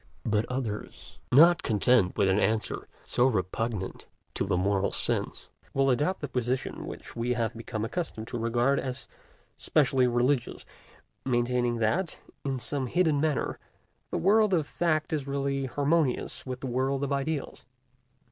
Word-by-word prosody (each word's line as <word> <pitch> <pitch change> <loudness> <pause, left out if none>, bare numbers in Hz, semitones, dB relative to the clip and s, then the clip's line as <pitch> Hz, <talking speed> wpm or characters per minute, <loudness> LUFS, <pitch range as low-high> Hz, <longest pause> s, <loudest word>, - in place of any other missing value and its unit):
But 105 0 +1
others, 125 -5 -5
not 165 +6 +7
content 105 -2 +2
with 100 - +3
an 95 +2 +3
answer 110 +2 0 0.2
so 125 - +3
repugnant 105 -1 -2 0.3
to 95 - -2
the 95 -2 +1
moral 100 +1 +1
sense, - - -1 0.3
will 135 0 +3
adopt 150 +9 0
the 145 - -3
position 125 0 -2
which - - -9
we 120 +1 0
have 115 -1 -1
become 110 -1 -4
accustomed 115 -6 -4
to 120 - -3
regard 120 +4 +2
as 130 0 -4 0.5
specially 135 -4 +3
religious, 120 +2 0 0.6
maintaining 120 -1 +1
that, 120 - 0 0.3
in 135 -2 -1
some 130 +1 -2
hidden 155 -1 +2
manner, 155 -3 0 0.5
the - - -2
world 210 0 +4
of 160 -4 +1
fact 155 -1 0
is 145 -3 -2
really 140 -1 -1
harmonious 145 0 0
with 130 -1 -5
the - - -4
world 130 +2 0
of 140 0 -1
ideals. 140 +2 -3
130 Hz, 145 wpm, -28 LUFS, 115-145 Hz, 0.6 s, not